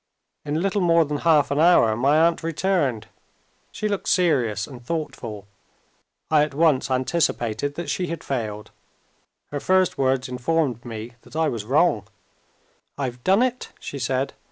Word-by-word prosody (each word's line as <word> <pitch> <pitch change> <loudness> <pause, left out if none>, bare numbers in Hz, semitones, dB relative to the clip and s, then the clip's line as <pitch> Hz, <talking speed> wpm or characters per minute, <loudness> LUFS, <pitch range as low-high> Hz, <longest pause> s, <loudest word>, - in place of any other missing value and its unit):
In 150 +2 -2
little 195 +1 0
more 170 -2 +4
than 145 0 -3
half 155 -3 +3
an 140 - +1
hour, 160 -10 +5
my 140 +6 +3
aunt 170 0 +1
returned. 160 - 0 0.7
She 215 - -3
looked 200 -2 -3
serious 125 - +2
and 125 -4 -12
thoughtful. 120 -9 -5 0.9
I 155 -1 +5
at 150 -2 -1
once 155 -5 +2
anticipated 130 -1 0
that 170 -1 -5
she 175 +6 -1
had 165 0 -5
failed. 110 -5 -4 0.8
Her 145 - -2
first 185 +3 +2
words 130 -1 +1
informed 125 -1 -1
me 115 0 -7
that - - -16
I 160 -1 +2
was 110 -3 -4
wrong. 135 - +2 0.9
"I've 125 -3 -4
done 195 +6 +4
it," 255 -1 -2
she - - -7
said. - - -1
145 Hz, 155 wpm, -23 LUFS, 120-170 Hz, 0.9 s, hour